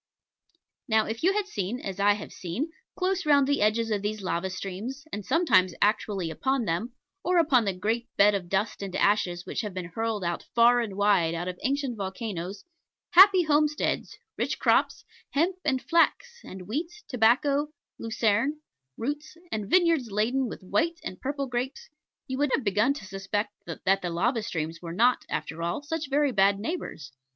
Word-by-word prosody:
Now 220 -2 +3
if 225 +1 -5
you 370 +3 +3
had 415 -1 0
seen, 220 - -3
as 195 -4 -6
I 205 +1 +5
have 205 0 -8
seen, 225 - -4 0.2
close 380 0 0
round 285 -3 +4
the 285 -4 +1
edges 220 +2 +2
of 205 -2 0
these 210 0 -3
lava 185 +1 -1
streams, 200 +9 -6
and 205 - -4
sometimes 185 - +3
actually 205 -4 +1
upon 265 +6 0
them, 210 +8 -2 0.3
or 360 +1 +2
upon 280 -9 +4
the 195 - 0
great 225 +6 -2
bed 205 +1 +6
of 185 -3 -3
dust 200 +3 -1
and 195 -2 -5
ashes 180 -4 +1
which - - -3
have 210 -4 -6
been 180 -2 -5
hurled 225 -4 -2 0.3
far 240 +1 +6
and 205 -4 -5
wide 195 -5 +3
out 175 +2 -3
of 180 -1 -5
ancient 270 -3 -1
volcanos, 190 -1 -5 0.5
happy 375 0 +8
homesteads, 300 -1 0 0.2
rich - - -1
crops, - - +2 0.3
hemp 345 +6 +1
and 265 -4 0
flax, 480 +8 +1
and 185 0 -9
wheat, 335 - -4
tobacco, 275 +5 +2 0.3
lucerne, 230 +5 0 0.4
roots, 295 +6 -4
and 210 -2 -3
vineyards 335 -9 +3
laden 235 +6 0
with 210 - -8
white 325 - 0
and 185 - -7
purple 280 +1 -2
grapes, 250 +1 -4 0.4
you 260 0 -4
would 290 0 +2
have 275 - -3
begun 210 +5 +2
to 240 - -8
suspect 195 +2 -3 0.2
that 185 +3 0
the 175 - -3
lava 225 +8 0
streams 165 -4 -4
were 170 -1 -6
not, 240 +7 +3
after 165 +1 -4
all, 170 +11 -2
such 300 -1 -4
very 290 0 +2
bad 200 -2 +3
neighbours. 215 - -5
225 Hz, 175 wpm, -27 LUFS, 195-285 Hz, 0.5 s, happy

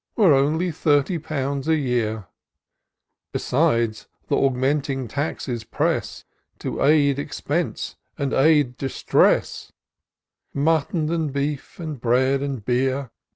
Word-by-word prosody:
Were 195 -9 +5
only 155 +6 +2
thirty 155 +1 +1
pounds 140 -2 -3
a 160 - +4
year. 120 -7 -1 1.1
Besides, 115 -2 0 0.2
th' - - -16
augmenting 135 0 +1
taxes 130 -4 -3
press. - - -2 0.3
To - - -4
aid 140 -1 +4
expense 150 +3 -3 0.2
and 140 -3 -2
add 145 -3 +3
distress: 135 -1 +1 0.8
Mutton 155 +2 +1
and 160 -4 -1
beef, 140 +3 -3
and 155 -7 -6
bread 130 +3 +2
and 135 -7 -4
beer. 130 0 0
140 Hz, 110 wpm, -23 LUFS, 130-155 Hz, 1.1 s, Were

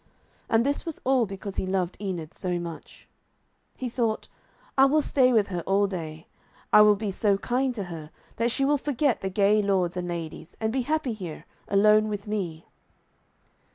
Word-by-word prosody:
And 225 +1 +3
this 285 +1 0
was 330 -2 -6
all 255 -3 +3
because 195 0 -7
he 185 - -1
loved 185 -2 -1
Enid 175 -6 -4
so 180 -1 -2
much. 170 -2 -8 0.7
He 255 - -3
thought, 230 -2 -1 0.5
'I 270 - +7
will 300 +3 +3
stay 255 -3 +3
with 215 -4 +3
her 175 -3 -3
all 195 +1 +3
day. 165 -4 -6 0.5
I 210 - +9
will 210 0 +7
be 205 0 -3
so 200 +1 +2
kind 250 +4 -1
to 205 - -3
her 165 -4 -8 0.3
that 230 +1 +1
she 270 +3 +1
will 290 +1 +2
forget 280 -2 0
the 190 - -2
gay 205 +2 +3
lords 190 -4 +1
and 180 -1 -3
ladies, 170 -1 -6
and 220 0 -1
be 265 - +1
happy 300 -1 -1
here, 180 -7 -7 0.2
alone 215 +2 +4
with 205 -1 -4
me.' 185 -7 -4
205 Hz, 185 wpm, -26 LUFS, 185-240 Hz, 0.7 s, I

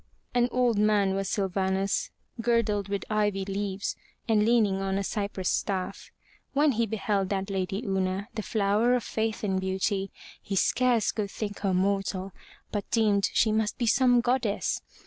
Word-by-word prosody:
An 245 0 +3
old 245 -4 +2
man 205 -2 +3
was 195 0 -2
Sylvanus, 190 0 0 0.3
girdled 220 -4 +1
with 200 -1 -2
ivy 205 -2 0
leaves, 195 0 -3 0.3
and 215 -2 +3
leaning 215 -4 +3
on 195 0 -1
a 200 - -1
cypress 200 -2 -3
staff. 190 -2 -2 0.4
When 290 +1 +4
he 230 -1 0
beheld 200 -2 -1
that 195 0 -2
lady 195 +4 -2
Una, 190 0 -1
the 215 - -3
flower 215 +4 +2
of 245 - -1
faith 220 +1 -2
and 190 -2 0
beauty, 190 +1 -1 0.3
he 200 - -4
scarce 240 +3 +2
could 210 -2 -3
think 205 0 -5
her 195 -2 0
mortal, 195 0 0 0.4
but 205 -2 -3
deemed 210 -4 +2
she 220 - +3
must 215 0 0
be 240 - 0
some 245 +1 +4
goddess. 240 -4 0
205 Hz, 160 wpm, -27 LUFS, 195-225 Hz, 0.4 s, When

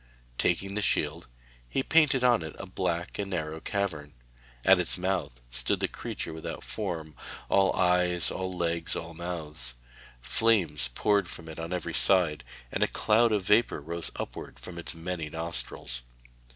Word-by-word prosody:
Taking 95 +3 +1
the 105 - -1
shield, 100 - +1 0.4
he 135 - 0
painted 150 -5 +4
on 120 -7 +5
it 80 -1 -6
a - - -6
black 85 +3 -2
and 100 -1 -2
narrow 80 -3 -2
cavern. 80 -8 -2 0.5
At - - +7
its - - +1
mouth 90 -9 -1
stood - - 0
the - - +1
creature - - -5
without 80 - -6
form; 85 -7 -4 0.4
all 95 -1 +5
eyes, 90 -1 +3
all 95 0 -3
legs, 85 -2 -1
all 85 0 -5
mouths. 80 -8 -4 0.4
Flames 75 - +2
poured 100 -4 +2
from 85 - -7
it 80 0 -7
on 80 +1 -4
every 90 -2 -2
side, 75 +3 +4 0.3
and - - -2
a - - +5
cloud 115 +2 +3
of 105 -3 +2
vapour 105 +1 +4
rose 85 +3 -4
upwards - - -6
from 85 -1 -8
its 85 - -6
many 85 -2 -4
nostrils. 65 -6 -4
85 Hz, 160 wpm, -29 LUFS, 80-95 Hz, 0.5 s, At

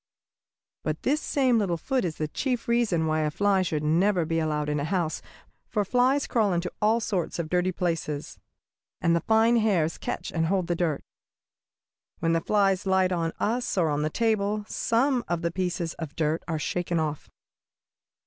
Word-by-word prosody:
"But 155 0 -3
this 295 +3 +1
same 255 -5 +2
little 180 -5 0
foot 260 - -1
is 165 -4 -2
the 155 - -2
chief 245 - -2
reason 230 -9 +2
why 155 0 +1
a 155 -1 +1
fly 195 +4 +2
should 155 -4 -1
never 175 +3 +2
be 165 +1 0
allowed 150 -2 -1
in 150 0 0
the 145 - -1
house, 170 -2 -1 0.5
for 210 -3 0
flies 255 +6 +2
crawl 215 -5 +1
into 175 +1 -1
all 220 +2 +3
sorts 195 -7 -2
of 165 -2 -3
dirty 180 +1 +2
places, 165 -5 -3 0.6
and 170 0 +2
the 170 - +1
fine 225 +4 +4
hairs 185 -8 +1
catch - - -4
and 165 -1 0
hold 185 0 +1
the 175 0 -1
dirt. 165 -4 -1 1.1
When 165 0 +1
the 165 - +2
fly 200 +1 +3
lights 190 -1 +2
on 165 -2 -1
us 240 0 -1
or 165 -3 +3
on 145 0 0
the 155 - 0
table, 210 +1 0
some 245 +2 +1
of 175 -1 -2
the 170 - 0
pieces 175 -2 -2
of 160 -3 -6
dirt 155 0 0
are 165 -2 -1
shaken 175 +2 -1
off." 155 -2 -3
180 Hz, 185 wpm, -26 LUFS, 160-215 Hz, 1.1 s, fine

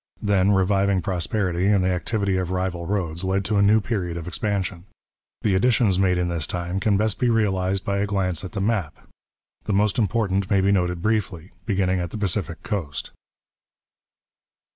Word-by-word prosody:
Then 100 -2 +3
reviving 95 0 +2
prosperity 90 0 -1
and 100 -2 +3
the 95 - +2
activity 100 +3 -1
of 90 -2 -2
rival 90 -2 -2
roads 85 -4 -2
led 95 0 0
to 105 +4 0
a - - +4
new 105 +2 +5
period 95 -6 -3
of 85 0 -6
expansion. 95 -1 -2 0.6
The 105 - +2
additions 100 -1 +3
made 90 -2 +3
in 90 0 0
this 85 -4 -2
time 90 +1 -3
can 100 0 +2
best 110 0 0
be 125 -2 +2
realized 95 -4 +1
by 100 0 0
a 100 - 0
glance 95 -3 -1
at 95 - -7
the 95 - -2
map 100 -7 -1
(opposite - - -26
next - - -25
page). - - -40
The 105 - -1
most 105 +2 +2
important 100 -4 0
may 100 - +3
be 100 +1 +3
noted 90 -3 0
briefly, 100 -6 -1 0.2
beginning 95 -2 +1
at 85 -1 -3
the 110 - -6
Pacific 95 -3 -2
coast. 80 -9 -4
95 Hz, 190 wpm, -23 LUFS, 90-100 Hz, 0.6 s, new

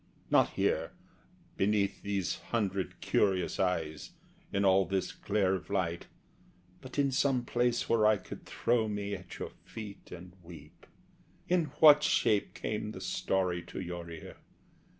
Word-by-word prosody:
Not - - +5
here, - - 0 0.6
beneath 100 0 +1
these 100 -3 -1
hundred 100 -5 -1
curious 95 -4 +1
eyes, 80 -5 -1 0.4
In 100 0 +1
all 95 0 +5
this 95 +1 -2
glare 95 -3 0
of 90 -2 -4
light; 90 -4 -1 0.7
but 130 +1 -10
in 140 -1 +2
some 130 -2 +1
place 120 0 0
Where 110 -2 +4
I 110 -1 +4
could - - -10
throw 115 -2 0
me 100 -1 -3
at 95 -2 -8
your - - -5
feet 105 -3 -9
and 90 0 -10
weep. 80 -4 -14 0.6
In 175 -2 +2
what 150 -2 +9
shape 110 -8 +2
came 105 0 -3
the - - -7
story 90 -1 -1
to - - -7
your 85 -2 -6
ear? 80 -1 -9
100 Hz, 145 wpm, -31 LUFS, 90-110 Hz, 0.7 s, what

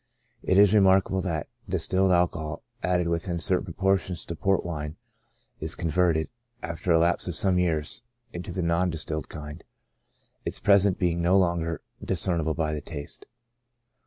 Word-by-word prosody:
It 95 - +1
is 100 0 +6
remarkable 95 -2 +4
that 80 -5 -3 0.2
distilled 95 0 +2
alcohol, 85 -3 0 0.2
added 90 -1 +1
within 85 +1 -1
certain 90 +2 0
proportions 95 -1 0
to 85 - -5
Port 95 +2 +1
wine, 75 -3 -4 0.6
is 80 +1 -1
converted, 85 -1 +1 0.4
after 85 +2 -2
a 80 - +6
lapse 85 +2 +2
of 90 - -2
some 90 +1 +3
years, 80 +2 0 0.3
into 90 +1 -6
the 90 0 -2
non 85 +2 +1
distilled 80 -2 -3
kind, 75 +1 -8 0.8
its - - -2
presence 100 -2 +4
being 85 -1 0
no 90 +3 +4
longer 85 -3 +1 0.2
discern 90 -2 0
ible 80 0 -1
by 80 -2 -1
the 75 - -3
taste. 75 -1 -8
85 Hz, 155 wpm, -26 LUFS, 80-95 Hz, 0.8 s, is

